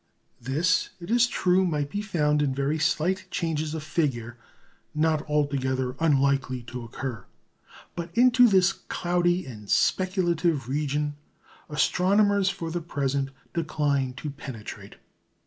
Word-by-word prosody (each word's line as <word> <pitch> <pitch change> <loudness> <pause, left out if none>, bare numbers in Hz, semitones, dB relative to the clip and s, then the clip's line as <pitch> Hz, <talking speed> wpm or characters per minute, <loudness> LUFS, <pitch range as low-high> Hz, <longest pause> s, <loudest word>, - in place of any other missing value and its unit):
This, 150 +9 +1
it 170 +4 -7
is 240 0 +5
true, 185 -5 +2
might 150 -5 -1
be 205 - -2
found 150 -7 +1
in 135 -3 0
very 140 +3 0
slight 175 +4 0
changes 160 -2 -2
of 155 - -5
figure, 125 -8 -1 0.6
not 155 0 +2
altogether 130 -3 0
unlikely 140 -4 +2
to 125 0 -7
occur. 115 -3 -6 0.7
But 170 0 -4
into 250 0 +6
this 190 -2 +4
cloudy 175 0 0
and 105 -6 -10
speculative 175 -6 +1
region 145 +1 -1 0.5
astronomers 195 +6 +3
for 170 -4 -4
the 175 +1 -2
present 140 -4 -1 0.2
decline 145 -5 0
to 145 +2 -5
penetrate. 130 -7 -9
150 Hz, 125 wpm, -26 LUFS, 135-175 Hz, 0.7 s, into